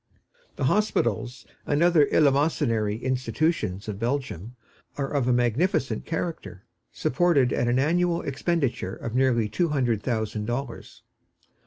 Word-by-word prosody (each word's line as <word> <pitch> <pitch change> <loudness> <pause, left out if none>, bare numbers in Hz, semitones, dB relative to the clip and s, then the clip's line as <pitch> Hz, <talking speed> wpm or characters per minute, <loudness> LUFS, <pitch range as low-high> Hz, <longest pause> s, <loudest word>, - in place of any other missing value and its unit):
The - - -4
hospitals 125 - 0 0.2
and 145 +3 +2
other 170 -5 +5
eleemosynary 135 -7 +2
institutions 130 - -1
of 105 -2 -5
Belgium 120 - -3 0.4
are 140 -1 -2
of 140 -4 +1
a - - +3
magnificent 125 - 0
character, 160 - -4 0.3
supported 140 -3 +2
at 120 - 0
an 120 +1 +2
annual 170 +4 +1
expenditure 135 - -1
of 115 - -6
nearly 125 -4 +2
two 170 - 0
hundred 125 -7 0
thousand 110 -3 -2
dollars. 120 +1 -5
130 Hz, 125 wpm, -25 LUFS, 115-155 Hz, 0.4 s, other